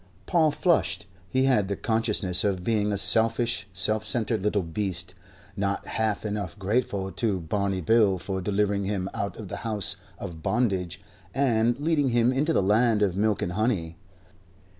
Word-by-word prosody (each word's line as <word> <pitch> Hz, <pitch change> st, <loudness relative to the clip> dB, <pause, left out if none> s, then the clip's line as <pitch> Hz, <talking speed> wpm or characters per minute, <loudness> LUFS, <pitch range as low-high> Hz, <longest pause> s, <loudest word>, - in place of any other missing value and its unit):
Paul 160 Hz, -, +3 dB
flushed. 170 Hz, -, +1 dB, 0.2 s
He 130 Hz, 0 st, +1 dB
had 125 Hz, -7 st, +2 dB
the 100 Hz, -, -2 dB
consciousness 105 Hz, -6 st, +2 dB
of 95 Hz, -3 st, -1 dB
being 105 Hz, 0 st, +1 dB
a 100 Hz, -, -1 dB
selfish, 115 Hz, +1 st, +3 dB
self 105 Hz, +4 st, 0 dB
centered 110 Hz, 0 st, -1 dB
little 105 Hz, -1 st, 0 dB
beast, 90 Hz, +1 st, -2 dB, 0.4 s
not 100 Hz, 0 st, -2 dB
half 110 Hz, -1 st, -2 dB
enough 100 Hz, -2 st, -4 dB
grateful 100 Hz, -1 st, -1 dB
to 105 Hz, -4 st, -1 dB
Barney 95 Hz, +3 st, -2 dB
Bill 105 Hz, 0 st, +3 dB
for 95 Hz, +1 st, -4 dB
delivering 100 Hz, +1 st, 0 dB
him 95 Hz, -2 st, -2 dB
out 100 Hz, -, -4 dB
of 110 Hz, -, -8 dB
the -, -, -6 dB
House 105 Hz, -3 st, +2 dB, 0.2 s
of 85 Hz, -5 st, -8 dB
Bondage 95 Hz, -5 st, -1 dB, 0.4 s
and 120 Hz, -2 st, +2 dB
leading 145 Hz, -2 st, +1 dB
him 120 Hz, +1 st, +2 dB
into 145 Hz, +5 st, +1 dB
the 100 Hz, -, +2 dB
Land 105 Hz, +2 st, +3 dB
of 95 Hz, -3 st, 0 dB
Milk 105 Hz, 0 st, +1 dB
and 85 Hz, -, -2 dB
Honey. 95 Hz, -5 st, -1 dB
105 Hz, 160 wpm, -26 LUFS, 95-115 Hz, 0.4 s, Paul